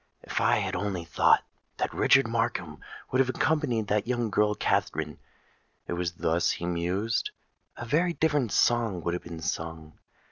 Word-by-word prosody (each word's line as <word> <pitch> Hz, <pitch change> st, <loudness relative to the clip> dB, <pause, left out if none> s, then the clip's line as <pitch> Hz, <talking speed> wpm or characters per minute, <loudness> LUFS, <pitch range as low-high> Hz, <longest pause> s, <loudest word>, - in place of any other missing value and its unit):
"If -, -, -2 dB
I -, -, +4 dB
had -, -, -2 dB
only 90 Hz, -3 st, -2 dB
thought -, -, +4 dB, 0.3 s
that -, -, -2 dB
Richard 135 Hz, -2 st, +4 dB
Markham 115 Hz, -10 st, -2 dB, 0.3 s
would 130 Hz, -, +1 dB
have 130 Hz, -1 st, +3 dB
accompanied 130 Hz, -6 st, +1 dB
that 105 Hz, +1 st, 0 dB
young 120 Hz, -3 st, -1 dB
girl 105 Hz, +1 st, +2 dB
Katharine,"—it 75 Hz, 0 st, -4 dB
was 85 Hz, 0 st, -2 dB
thus 85 Hz, 0 st, +1 dB
he 85 Hz, -, -2 dB
mused,—"a 90 Hz, +7 st, -3 dB
very 170 Hz, +8 st, +2 dB
different 150 Hz, -9 st, +1 dB
song 115 Hz, -7 st, +2 dB
would 85 Hz, -, -1 dB
have 90 Hz, -, -3 dB
been 85 Hz, -2 st, -8 dB
sung. 80 Hz, -1 st, -5 dB
105 Hz, 150 wpm, -28 LUFS, 85-120 Hz, 0.3 s, I